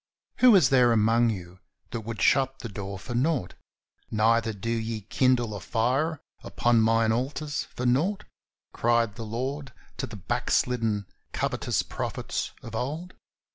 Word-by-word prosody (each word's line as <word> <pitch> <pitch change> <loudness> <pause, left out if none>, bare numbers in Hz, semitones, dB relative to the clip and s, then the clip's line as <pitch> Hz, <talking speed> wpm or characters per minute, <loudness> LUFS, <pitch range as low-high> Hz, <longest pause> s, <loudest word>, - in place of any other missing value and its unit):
"Who 250 -4 +7
is 165 -10 +5
there 125 -3 +5
among 115 +1 +3
you 90 -3 -6 0.3
that 115 - -3
would 110 0 -4
shut 135 -1 +3
the 115 - -6
door 100 -1 -6
for 110 +6 -7
nought? 125 - 0 0.6
neither 115 +1 +2
do 110 +2 -4
ye 115 -1 -2
kindle 120 +1 +1
a 100 - -5
fire 130 - 0 0.2
upon 120 -1 +2
mine 115 0 +3
altars 145 +5 -2
for 125 - -3
nought," 155 +12 +1 0.5
cried 115 -2 +2
the 115 - -9
Lord 130 +4 -4 0.2
to - - -3
the 110 - -9
backslidden, 110 +2 0 0.3
covetous - - -1
prophets - - -4
of 115 - -9
old. 150 +10 -4
115 Hz, 145 wpm, -27 LUFS, 110-130 Hz, 0.6 s, Who